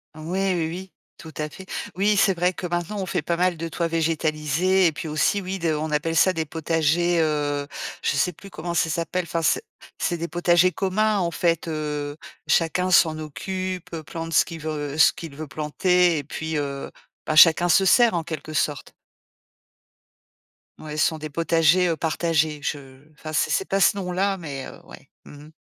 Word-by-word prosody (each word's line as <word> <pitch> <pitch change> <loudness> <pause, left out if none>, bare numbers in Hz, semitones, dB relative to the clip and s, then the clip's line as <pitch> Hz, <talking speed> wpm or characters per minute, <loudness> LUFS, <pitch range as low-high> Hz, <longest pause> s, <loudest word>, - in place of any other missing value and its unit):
Ouais, 185 +5 -1
oui, 165 -2 -1
oui, 185 +3 -7 0.2
tout 160 -1 -11
à 150 0 -3
fait. 190 - -12 0.3
Oui, 205 +3 +2
c'est 195 -3 +4
vrai 180 +2 +1
que 180 - -5
maintenant, 175 +4 -3
on 190 - -3
fait - - -2
pas 170 - 0
mal 180 0 +1
de 165 +1 -4
toits 165 +1 -2
végétalisés. 165 +2 +1
Et 165 - +4
puis 160 +2 -6
aussi, 155 +6 +1
oui 190 +1 -4
de 165 -3 0
on 155 +1 -2
appelle 155 +2 -1
ça 185 +4 +4
des 160 -2 -2
potagers, 165 +2 +1
heu, 145 -2 0 0.4
je - - +2
sais 180 - +1
plus 195 +4 -14
comment 170 +1 -5
ça 160 -1 +1
s'appelle. 170 +3 -2
Enfin, 170 0 -3
c'est 165 - +1 0.3
c'est 175 - -1
des 170 - -4
potagers 175 +2 +3
communs. 205 +4 +1
En 170 -3 0
fait, 170 -1 0
heu, 150 -2 -3 0.3
chacun 180 +3 +1
s'en 160 -3 +5
occupe, 185 +4 -5
plante 165 +1 -6
ce - - +5
qu'il 165 -1 -8
veut 150 -1 -4
ce 160 - +6
qu'il 160 -4 -9
veut 155 +1 -7
planter 170 +3 +1
et 145 - -5
puis, 160 +2 -4
heu, 140 -1 -4 0.3
bah, 155 - -1
chacun 165 +2 +7
se 185 +2 +4
sert, 235 +4 +5
en 170 - 0
quelque 155 -2 -6
sorte. 150 -2 -2 1.9
Ouais, 150 -1 -7
ce 150 - +4
sont 160 -2 -1
des 155 0 -6
potagers, 165 +3 +3
heu, 165 - +1
partagés, 160 -2 0
je 135 -3 -5
enfin 155 +1 -9
c'est 150 - +1
c'est 190 - +1
pas 195 - +1
ce 200 - +4
nom-là, 195 +1 -1
mais, 140 -6 -6
heu, - - -11
ouais, - - -14 0.2
mmh 145 0 -12
mh. 155 - -16
165 Hz, 195 wpm, -23 LUFS, 155-180 Hz, 1.9 s, chacun